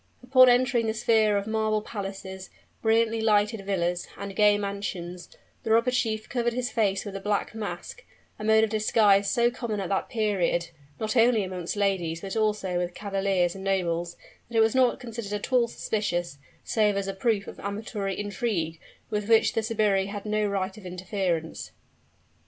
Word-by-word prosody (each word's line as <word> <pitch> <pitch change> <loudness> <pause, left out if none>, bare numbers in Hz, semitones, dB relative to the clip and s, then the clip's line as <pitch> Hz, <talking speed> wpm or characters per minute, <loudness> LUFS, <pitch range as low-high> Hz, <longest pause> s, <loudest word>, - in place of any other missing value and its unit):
Upon 255 0 +7
entering 245 -2 +3
the 220 - -1
sphere 220 -3 +3
of 200 - -2
marble 220 -1 0
palaces, 195 -2 -6 0.3
brilliantly 225 0 +2
lighted 210 -1 +2
villas, 175 -3 -1
and 200 -1 -6
gay 210 -1 +5
mansions, 195 -3 -5 0.3
the - - -5
robber 230 +3 +4
chief 220 -3 -1
covered 240 -1 -1
his 245 0 -2
face 205 -4 0
with 200 -1 -6
a - - -3
black 205 +1 -1
mask 220 -2 -6 0.4
a - - -6
mode 220 0 +5
of 220 - 0
disguise 210 -2 +3
so 240 -1 +3
common 235 -4 -4
at 190 - -3
that 195 - -1
period, 190 -6 0 0.3
not 215 +1 -2
only 230 -2 +4
amongst 185 -1 -4
ladies, 185 -5 0
but 195 +1 -5
also 210 -5 0
with 175 0 -3
cavaliers 195 -3 0
and 195 - -9
nobles, 175 -3 -1 0.3
that 235 - -2
it - - +6
was 220 0 +3
not 255 -2 +3
considered 230 -4 -6
at 210 +5 -4
all 245 -2 +4
suspicious, 175 -9 -2 0.2
save 210 -3 +1
as 200 0 -2
a 195 - -2
proof 200 0 0
of - - -10
amatory 200 -1 -4
intrigue, 200 -6 -2 0.3
with 210 0 -2
which 225 -1 +5
the 225 - +1
sbirri 210 -3 +1
had 200 0 -6
no 215 0 0
right 195 -1 -2
of 200 - -14
interference. 180 -3 -3
205 Hz, 175 wpm, -26 LUFS, 195-225 Hz, 0.4 s, Upon